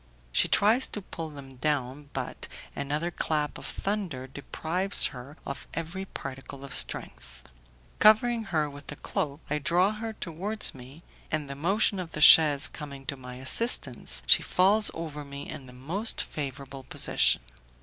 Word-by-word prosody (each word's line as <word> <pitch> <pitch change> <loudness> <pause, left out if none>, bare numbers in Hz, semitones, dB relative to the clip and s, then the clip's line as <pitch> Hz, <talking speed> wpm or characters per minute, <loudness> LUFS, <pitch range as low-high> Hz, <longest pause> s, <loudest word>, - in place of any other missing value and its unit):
She - - +3
tries 225 +6 +4
to 210 - -3
pull 165 -3 -6
them 135 -3 -11
down, 140 0 -1
but - - -4 0.3
another 150 +5 -2
clap 150 -3 -1
of - - -7
thunder 190 -11 -3
deprives 160 +7 0
her 135 +4 -10
of 140 - -6
every 170 +4 -4
particle 135 -4 -8
of 140 - -5
strength. 60 0 -4 0.6
Covering 225 +2 +5
her 160 -5 0
with 145 0 -11
the - - -5
cloak, 145 +1 -3
I 150 +1 -1
draw 175 +7 +3
her 220 +1 -5
towards 200 +4 -1
me, 135 +5 -10 0.3
and 155 -2 -1
the 140 - -5
motion 195 +7 +1
of 175 -3 -6
the - - -4
chaise 150 -2 +9
coming 140 -3 -9
to 140 - -3
my 125 -1 -9
assistance, 130 - 0
she - - +6
falls 200 +4 +3
over 155 -3 -5
me 140 0 -7
in 130 - -8
the - - -12
most 165 - -2
favourable 135 -2 -5
position. 125 - +2
150 Hz, 160 wpm, -28 LUFS, 140-185 Hz, 0.6 s, chaise